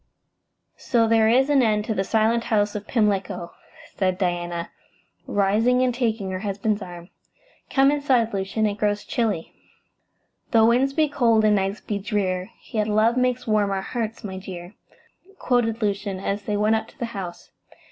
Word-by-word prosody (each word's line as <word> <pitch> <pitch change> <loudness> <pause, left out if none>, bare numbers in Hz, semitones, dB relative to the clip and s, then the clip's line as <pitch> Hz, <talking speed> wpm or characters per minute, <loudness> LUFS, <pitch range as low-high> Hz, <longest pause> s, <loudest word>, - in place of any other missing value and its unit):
"So 230 -2 +2
there 225 -1 +4
is 260 +4 +4
an 280 -2 +5
end 210 -3 +1
to 220 - -1
the 195 - 0
Silent 225 +3 +1
House 205 -2 +1
of 210 -1 -6
Pimlico," 195 -6 0 0.4
said 185 -2 0
Diana, 175 -2 -2 0.6
rising 220 +6 +2
and 250 -1 +1
taking 225 -5 -1
her 185 - -3
husband's 205 +1 -1
arm. 175 -1 -9 0.6
"Come 270 +1 +4
inside, 260 -6 +1
Lucian. 195 +3 -1
It 205 -1 -2
grows 205 -1 0
chilly." 215 -9 -2 1.0
"'Tho' 225 -1 +5
winds 255 +4 +3
be 310 +1 +2
cold 235 -6 +3
and 210 -1 +4
nights 195 +1 -1
be 205 -2 -3
drear, 190 -2 -2 0.2
Yet 215 -2 0
love 215 +2 +3
makes 250 0 0
warm 215 -2 +2
our 195 -1 -2
hearts, 225 0 -4
my 190 -2 -5
dear,'" 180 -1 -9 0.6
quoted 235 -2 0
Lucian, 200 -2 -2
as 200 +1 -2
they 210 -1 -1
went 215 +2 +3
up 220 - -5
to - - -19
the 240 - -3
house. 180 -3 -7
210 Hz, 165 wpm, -23 LUFS, 195-230 Hz, 1.0 s, an